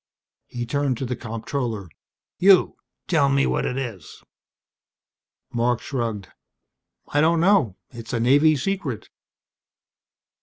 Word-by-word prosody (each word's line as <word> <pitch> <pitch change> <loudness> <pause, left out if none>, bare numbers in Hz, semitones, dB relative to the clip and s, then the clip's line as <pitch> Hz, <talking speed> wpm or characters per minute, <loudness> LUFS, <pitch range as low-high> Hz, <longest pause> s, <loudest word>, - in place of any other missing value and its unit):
He 120 -1 -5
turned 140 0 -1
to 130 - -3
the 125 0 -3
comptroller. 115 -3 -4 0.5
"You 190 0 +5 0.3
tell 145 -5 +3
me 140 0 +3
what - - 0
it 125 - -3
is." 115 - -7 1.3
Marc 120 0 +1
shrugged. 115 -7 -4 0.8
"I 145 - +2
don't 165 +1 +3
know. 165 - +3 0.2
It's 115 -2 -9
a 120 - -1
Navy 145 +6 +4
secret." 145 - -3
130 Hz, 115 wpm, -23 LUFS, 115-145 Hz, 1.3 s, You